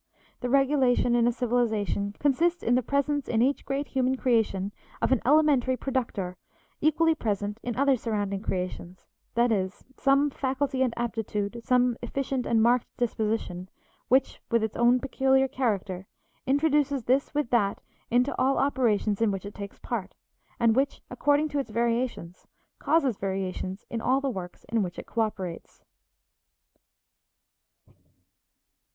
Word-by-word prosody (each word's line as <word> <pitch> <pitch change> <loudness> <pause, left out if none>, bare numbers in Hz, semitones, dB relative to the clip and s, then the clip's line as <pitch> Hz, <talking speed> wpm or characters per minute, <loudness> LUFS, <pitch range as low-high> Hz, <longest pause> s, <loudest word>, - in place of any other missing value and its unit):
The 245 - -3
regulation 265 -2 +3
in 240 -1 +3
a - - +4
civilization 220 -4 -1
consists 335 +5 +1
in 235 - +2
the 250 - +4
presence 280 +2 0
in 225 0 +2
each 275 +2 0
great 280 +1 -2
human 260 0 +1
creation 220 -6 +1 0.3
of - - 0
an 260 - +3
elementary 275 -4 +4
productor 230 -10 -3 0.4
equally 320 +2 +3
present 210 -5 -2
in 240 -2 -4
other 275 +1 +3
surrounding 205 -4 -2
creations, 180 -2 -4 0.3
that 235 0 +3
is, 190 -2 -1
some 275 +1 +3
faculty 265 0 -1
and 255 -2 +2
aptitude, 225 -1 -3
some 250 -1 +2
efficient 265 +1 -2
and 225 -1 +3
marked 240 +1 +3
disposition, 215 -6 -2 0.4
which, 260 +1 +2
with 230 -2 +2
its 220 - -2
own 240 +1 +4
peculiar 265 0 +2
character, 200 -8 -2 0.4
introduces 285 -1 +2
this 265 +5 +1
with 295 -5 -1
that 205 -5 +2 0.3
into 245 +4 +2
all 270 +1 +3
operations 225 -6 +1
in 225 - +4
which 195 -1 -3
it 205 - -7
takes 200 0 -8
part, - - -5 0.4
and 230 -2 +4
which, 275 +2 0
according 290 +1 +2
to 290 -1 -2
its 270 - -3
variations, 230 -5 -2 0.3
causes 280 -7 +2
variation 190 -1 -3
in 230 - -4
all 260 +3 +2
the 275 -1 -1
works 180 -5 -7
in 230 -1 +1
which 180 -3 -4
it - - -7
coöperates. 195 -6 -4
245 Hz, 145 wpm, -27 LUFS, 210-270 Hz, 0.4 s, a